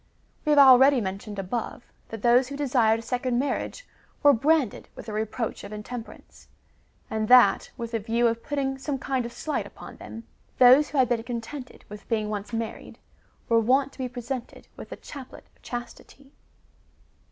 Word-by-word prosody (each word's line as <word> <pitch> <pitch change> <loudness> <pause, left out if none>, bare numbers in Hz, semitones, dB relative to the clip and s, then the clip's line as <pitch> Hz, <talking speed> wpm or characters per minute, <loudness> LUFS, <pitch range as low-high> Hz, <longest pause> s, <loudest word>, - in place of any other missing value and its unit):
^ - - -39 0.4
We - - -1
have 295 - +4
already 270 0 +7
mentioned 200 0 -5
above,^ 220 +5 -4 0.3
that 225 -2 -8
those 245 +2 +4
who 280 +1 -7
desired 245 -6 +2
a - - -9
second 245 +1 -1
marriage 285 - -3 0.4
were 290 -1 +7
branded 280 0 +1
with - - -10
the 220 - -7
reproach 220 +2 -3
of 200 - -9
intemperance, 220 +2 -9 0.6
and 220 0 -1
that, 250 +1 +6
with 235 -1 -5
the 230 - -1
view 230 +3 0
of 230 0 +1
putting 270 -1 -2
some 275 0 -3
kind 260 -2 -2
of - - -11
slight 305 +5 -3
upon - - -12
them, 225 - -9 0.3
those 260 +4 +7
who 295 - -4
had 260 -2 +4
been 235 -1 0
contented 245 +3 -7
with 210 0 -12
being 215 -2 0
once 205 +1 -5
married, 225 -1 -5 0.5
were 230 -1 +4
wont 265 +5 +2
to - - -21
be 255 -1 -3
presented 245 0 -7
with - - -10
the - - -6
" - - -23
chaplet 275 -4 -10
of - - -31
chastity." 250 +3 -9
245 Hz, 185 wpm, -26 LUFS, 225-270 Hz, 0.6 s, already